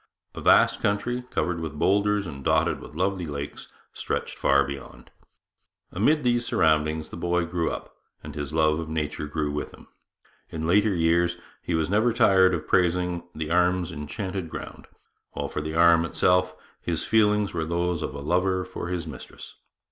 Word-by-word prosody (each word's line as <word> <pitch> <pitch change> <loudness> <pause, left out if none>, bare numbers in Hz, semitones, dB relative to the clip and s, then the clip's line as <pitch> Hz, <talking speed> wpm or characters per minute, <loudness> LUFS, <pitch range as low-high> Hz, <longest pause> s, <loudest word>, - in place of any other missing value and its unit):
A - - -7
vast - - +4
country, 120 +5 -1
covered 90 -2 -1
with 80 -2 -5
boulders 100 +3 +2
and 70 -5 -8
dotted - - +2
with - - -12
lovely 95 0 -1
lakes, 70 -1 -6 0.3
stretched - - -3
far 70 0 +3
beyond. 70 -3 -9 0.8
Amid 145 - +2
these 120 -1 +2
surroundings 80 -5 +1
the - - -8
boy 85 0 0
grew 85 -1 -1
up, - - -7 0.3
and - - -8
his 75 -2 -5
love 80 0 +2
of 80 -1 -5
nature 75 -1 -3
grew 75 -1 -2
with 75 - -3
him. - - -18 0.6
In 80 -1 -4
later 100 +4 +3
years 85 +1 +2 0.2
he 85 - -2
was 80 -1 +1
never 110 +5 +2
tired 95 -4 +5
of 80 -2 -6
praising 90 -1 +1
the 80 0 -4
'Arm's 90 0 +2
enchanted 90 +4 -5
ground,' - - -8 0.5
while - - -3
for 75 - -3
the 80 +1 -5
Arm 85 0 +6
itself 90 +2 +2 0.3
his 85 -2 -1
feelings 105 -2 +2
were 80 - -1
those 85 +1 -1
of 75 - -4
a 70 - -6
lover 90 +4 +1
for 90 -2 -6
his 90 -2 -3
mistress. - - -10
85 Hz, 170 wpm, -25 LUFS, 80-95 Hz, 0.8 s, Arm